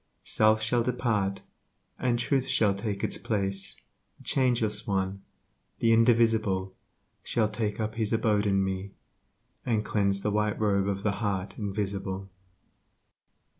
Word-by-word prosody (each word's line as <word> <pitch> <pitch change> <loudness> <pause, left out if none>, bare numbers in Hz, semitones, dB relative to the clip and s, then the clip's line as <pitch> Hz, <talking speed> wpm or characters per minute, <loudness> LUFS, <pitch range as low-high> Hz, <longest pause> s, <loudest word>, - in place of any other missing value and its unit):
Self 110 0 +3
shall 120 +2 +2
depart, 115 -5 0 0.6
and 120 -2 +1
Truth 130 +2 0
shall 105 -3 +3
take 100 0 -3
its - - -1
place 100 -2 -2 0.4
The - - -17
Changeless 115 -5 +1
One, 95 -1 -1 0.6
the 115 0 +3
Indivisible 110 -5 +3 0.5
Shall 110 -2 +1
take 105 -1 -3
up 110 0 -2
His 110 -2 -1
abode 105 -2 +2
in 95 -1 +2
me, 95 +1 -3 0.7
and 110 -3 0
cleanse 100 -2 +1
The 105 - +1
White 105 0 0
Robe 100 -2 +2
of 100 0 -2
the 100 -2 0
Heart 95 -2 -1
Invisible. 100 -2 -3
105 Hz, 130 wpm, -28 LUFS, 100-115 Hz, 0.7 s, Self